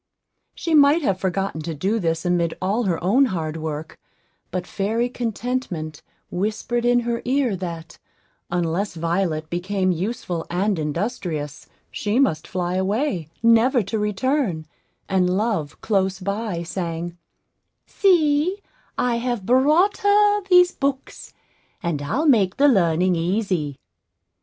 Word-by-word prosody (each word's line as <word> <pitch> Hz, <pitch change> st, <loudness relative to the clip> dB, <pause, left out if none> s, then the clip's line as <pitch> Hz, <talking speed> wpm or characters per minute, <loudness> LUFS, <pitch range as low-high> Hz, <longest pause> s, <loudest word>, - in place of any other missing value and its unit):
She 335 Hz, -, -2 dB
might 295 Hz, +2 st, +5 dB
have 195 Hz, -7 st, 0 dB
forgotten 190 Hz, -3 st, -2 dB
to 160 Hz, +1 st, -4 dB
do 200 Hz, +9 st, 0 dB
this 165 Hz, -2 st, -1 dB
amid 175 Hz, -2 st, +1 dB
all 205 Hz, +6 st, 0 dB
her 175 Hz, -4 st, +1 dB
own 240 Hz, +10 st, +4 dB
hard 165 Hz, -9 st, -3 dB
work; 155 Hz, 0 st, -5 dB, 0.5 s
but 180 Hz, 0 st, -3 dB
fairy 220 Hz, +6 st, -1 dB
Contentment 230 Hz, -, -3 dB, 0.3 s
whispered 220 Hz, +5 st, -1 dB
in 245 Hz, 0 st, +4 dB
her 235 Hz, 0 st, -2 dB
ear 255 Hz, -4 st, +1 dB
that, 170 Hz, -3 st, -7 dB, 0.5 s
unless 175 Hz, +2 st, -1 dB
Violet 165 Hz, -1 st, -1 dB
became 185 Hz, +2 st, 0 dB
useful 180 Hz, -2 st, -3 dB
and 190 Hz, +1 st, 0 dB
industrious, 155 Hz, -, -3 dB, 0.2 s
she 210 Hz, +2 st, -1 dB
must 165 Hz, -, +1 dB
fly 180 Hz, -1 st, -2 dB
away, 190 Hz, -, -1 dB
never 230 Hz, +2 st, +4 dB
to 200 Hz, +3 st, -3 dB
return; 210 Hz, -, 0 dB, 0.4 s
and 185 Hz, -2 st, +2 dB
Love, 200 Hz, -9 st, -1 dB
close 190 Hz, -3 st, 0 dB
by, 200 Hz, -2 st, -3 dB
sang, 170 Hz, -1 st, -4 dB, 0.7 s
"See 340 Hz, -1 st, +2 dB, 0.4 s
I 245 Hz, -1 st, +1 dB
have 240 Hz, -4 st, -2 dB
brought 300 Hz, -, +4 dB
her 415 Hz, 0 st, +4 dB
these 360 Hz, -1 st, +6 dB
books; 275 Hz, -1 st, -3 dB, 0.5 s
and 165 Hz, -5 st, -1 dB
I'll 265 Hz, -, -1 dB
make 200 Hz, -9 st, +3 dB
the 285 Hz, -, +5 dB
learning 180 Hz, -, +3 dB
easy." 170 Hz, -5 st, -1 dB
195 Hz, 130 wpm, -22 LUFS, 170-245 Hz, 0.7 s, these